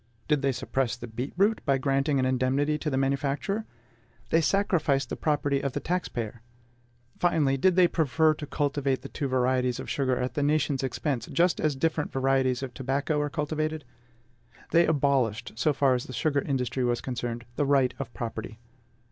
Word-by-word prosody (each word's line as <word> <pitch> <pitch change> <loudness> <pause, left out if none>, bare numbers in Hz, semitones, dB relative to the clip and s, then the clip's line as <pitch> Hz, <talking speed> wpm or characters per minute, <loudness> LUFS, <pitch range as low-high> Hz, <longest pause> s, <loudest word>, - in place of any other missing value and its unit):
Did 150 -2 +2
they 135 -1 +2
suppress 130 -1 -1
the 120 - -7
beet 120 +4 -5
root 205 +4 +3
by 140 -2 +2
granting 135 +2 +1
an 130 - +2
indemnity 130 +4 +1
to 150 - -2
the 135 - -1
manufacturer? 140 - -1 0.7
They 165 - +4
sacrificed 155 -8 +1
the - - -3
property 145 -2 0
of 140 -2 -2
the - - -1
tax 180 +1 -2
payer. 115 -1 -5 0.8
Finally, 155 -6 +2
did 185 +6 +3
they 180 -1 +6
prefer 160 -1 +2
to 150 -1 -8
cultivate 140 -3 -1
the - - -7
two 140 - -3
varieties 125 -1 +1
of - - -5
sugar 130 -3 +1
at 125 +1 -2
the 145 - -1
nation's 145 -2 +1
expense, 130 -1 -2
just 175 0 +2
as 150 -2 +1
different 155 +2 -1
varieties 135 -1 +1
of 130 -2 -5
tobacco 140 +4 -1
are 145 - -1
cultivated? 155 0 -2 0.9
They 170 0 +5
abolished, 135 -7 +1
so 150 +7 +2
far 135 -2 +3
as 125 -1 -1
the 130 - -9
sugar 140 +5 +1
industry 130 -2 -1
was 120 -1 +1
concerned, 120 -2 -4
the 145 - +1
right 135 -3 +3
of 130 -3 -5
property. 115 -1 -5
140 Hz, 180 wpm, -27 LUFS, 130-150 Hz, 0.9 s, they